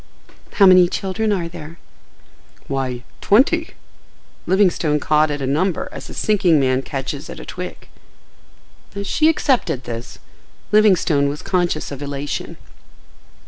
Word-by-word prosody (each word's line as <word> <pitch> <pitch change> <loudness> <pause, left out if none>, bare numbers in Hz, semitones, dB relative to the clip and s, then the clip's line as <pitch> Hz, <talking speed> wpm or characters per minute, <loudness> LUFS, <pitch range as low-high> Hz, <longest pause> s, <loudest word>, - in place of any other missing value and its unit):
"How 200 - +5
many 185 -1 +7
children 200 +4 -2
are 180 -4 -1
there?" 165 0 -10 0.9
"Why—twenty." 140 - 0 0.7
Livingston 175 -6 +2
caught 155 +1 +2
at 145 -1 -3
a - - 0
number, 160 +7 -1
as - - -9
a - - -9
sinking 190 -7 +2
man 130 -1 +1
catches 135 +2 -5
at - - -8
a - - -9
twig. 180 0 -8 1.1
As 200 0 -4
she 310 +10 +3
accepted 260 - 0
this, 120 0 -7 0.5
Livingstone 180 -9 +3
was 145 +1 -6
conscious 175 -5 -1
of 140 0 -7
elation. 145 0 -5
165 Hz, 125 wpm, -20 LUFS, 140-195 Hz, 1.1 s, many